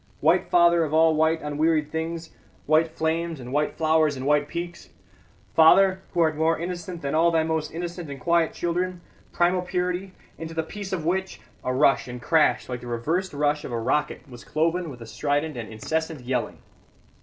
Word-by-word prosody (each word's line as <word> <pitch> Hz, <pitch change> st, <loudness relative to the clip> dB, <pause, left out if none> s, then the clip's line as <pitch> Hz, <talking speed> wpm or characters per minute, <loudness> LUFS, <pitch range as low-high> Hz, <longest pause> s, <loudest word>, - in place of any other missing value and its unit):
White -, -, +2 dB
Father 170 Hz, -1 st, +5 dB
of 155 Hz, 0 st, -1 dB
all 160 Hz, 0 st, +5 dB
white 160 Hz, +1 st, +2 dB
unwearied 150 Hz, +1 st, 0 dB
things, 165 Hz, +1 st, -4 dB, 0.3 s
white 155 Hz, +2 st, +4 dB
flames 160 Hz, 0 st, -2 dB
and 125 Hz, +1 st, -8 dB
white 150 Hz, +1 st, 0 dB
flowers 155 Hz, -2 st, +2 dB
and 130 Hz, -, -5 dB
white 145 Hz, 0 st, +2 dB
peaks. 170 Hz, +2 st, -6 dB, 0.6 s
Father, 190 Hz, +4 st, +6 dB
who 175 Hz, -, +2 dB
art 160 Hz, -1 st, +2 dB
more 160 Hz, +2 st, +2 dB
innocent 175 Hz, 0 st, -5 dB
than 140 Hz, -, -2 dB
all 165 Hz, +2 st, +4 dB
thy 165 Hz, -1 st, +2 dB
most 160 Hz, -1 st, -1 dB
innocent 170 Hz, -1 st, -6 dB
and 140 Hz, -1 st, -7 dB
quiet 170 Hz, +4 st, +2 dB
children; 180 Hz, +1 st, -2 dB, 0.3 s
primal 180 Hz, +1 st, +2 dB
purity, 180 Hz, +1 st, -2 dB, 0.3 s
into 165 Hz, 0 st, -7 dB
the 160 Hz, -, 0 dB
peace 200 Hz, +4 st, -7 dB
of 170 Hz, -5 st, -3 dB
which 190 Hz, +3 st, -1 dB
" -, -, -32 dB
A 130 Hz, -, -1 dB
rush 135 Hz, +1 st, +3 dB
and 125 Hz, 0 st, -7 dB
crash 150 Hz, -2 st, +2 dB
like 125 Hz, -1 st, -5 dB
the 125 Hz, -, -9 dB
reversed 160 Hz, +11 st, -1 dB
rush 145 Hz, 0 st, 0 dB
of -, -, -6 dB
a 120 Hz, -, -2 dB
rocket 150 Hz, +7 st, -1 dB
was 120 Hz, -3 st, -12 dB
cloven 165 Hz, +2 st, 0 dB
with 125 Hz, -4 st, -10 dB
a -, -, -7 dB
strident 145 Hz, +6 st, -1 dB
and 120 Hz, -2 st, -6 dB
incessant 160 Hz, +6 st, -3 dB
yelling. 125 Hz, +1 st, -2 dB
160 Hz, 190 wpm, -25 LUFS, 145-170 Hz, 0.6 s, Father